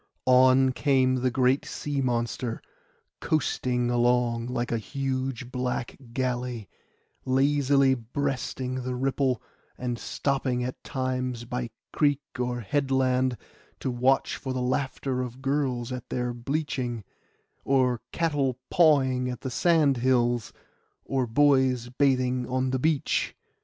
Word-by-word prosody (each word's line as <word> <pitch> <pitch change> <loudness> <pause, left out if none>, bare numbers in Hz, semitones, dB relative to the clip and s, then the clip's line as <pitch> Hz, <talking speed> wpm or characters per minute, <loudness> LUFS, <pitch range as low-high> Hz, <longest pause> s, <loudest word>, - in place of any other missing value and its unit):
On 130 +1 +5
came 130 -1 +2
the 130 0 +1
great 130 +2 +2
sea 145 -2 -3
monster, 120 -1 -1 0.6
coasting 125 -5 0
along 120 -1 +2
like 120 -1 -2
a 115 - 0
huge 130 0 -3
black 125 -1 -2 0.2
galley, 125 -3 -2 0.6
lazily 135 0 +3
breasting 130 +1 -3
the 125 0 -3
ripple, 130 -1 0 0.3
and 120 -2 -3
stopping 130 +1 -1
at 125 +1 -5
times 130 -2 -2
by 125 0 -3 0.2
creek 145 -2 +2 0.2
or 125 -1 -1
headland 130 0 +1 0.4
to 130 - -2
watch 130 +2 +2
for 130 -2 -4
the 130 - -2
laughter 130 0 -1
of 125 0 -6
girls 135 -3 -1
at 125 -2 -6
their 125 -1 -2
bleaching, 125 -2 -3 0.6
or 130 -3 +2
cattle 145 -6 0
pawing 135 -7 +4
on 125 - -4
the 130 - -4
sand 155 -2 +3
hills, 120 -2 +1 0.5
or 130 -2 0
boys 130 -1 +3
bathing 130 -1 +1
on 130 0 0
the 130 - 0
beach. 155 +1 0
130 Hz, 120 wpm, -27 LUFS, 125-135 Hz, 0.6 s, On